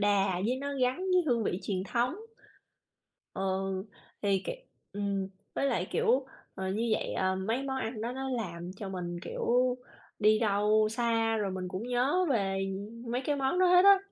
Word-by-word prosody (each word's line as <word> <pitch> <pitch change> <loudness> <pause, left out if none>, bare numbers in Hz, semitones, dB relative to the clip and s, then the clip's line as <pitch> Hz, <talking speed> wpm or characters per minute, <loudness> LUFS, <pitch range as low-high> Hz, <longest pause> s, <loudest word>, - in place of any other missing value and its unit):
đà 195 -3 +2
với 250 +2 +1
nó 280 0 -3
gắn 250 0 +2
với 365 -1 +2
hương 235 -5 +2
vị 180 - 0
truyền 190 -2 -1
thống. 240 +5 +1 1.2
Ừ, - - -4 0.8
thì 200 -1 +3
kiều - - -3 0.4
ừm, 200 -1 -1 0.3
với 275 - +1
lại, 205 -9 0
kiểu, 260 +3 +2 0.3
ờ, 190 0 -3
như 220 +5 0
vậy, - - 0
ờ, 190 0 +1
mấy 225 +8 -1
món 270 -1 -2
ăn 225 -3 -3
đó 235 +3 -2
nó 265 +1 -4
làm 180 -7 -4
cho 200 0 -5
mình, 175 -2 -4
kiểu, 250 +1 +1 0.4
đi 215 0 +5
đâu 215 0 +3
xa 225 -1 +1
rồi 205 -2 -1
mình 185 -1 -4
cũng 185 +3 -4
nhớ 265 +9 +2
về, 195 -5 +1 0.2
ừm, 230 +4 -7
mấy 250 - +1
cái 290 -1 +1
món 275 +6 +1
đó 370 - +5
hết 360 +1 +6
á. 400 -1 +9
225 Hz, 185 wpm, -30 LUFS, 195-255 Hz, 1.2 s, á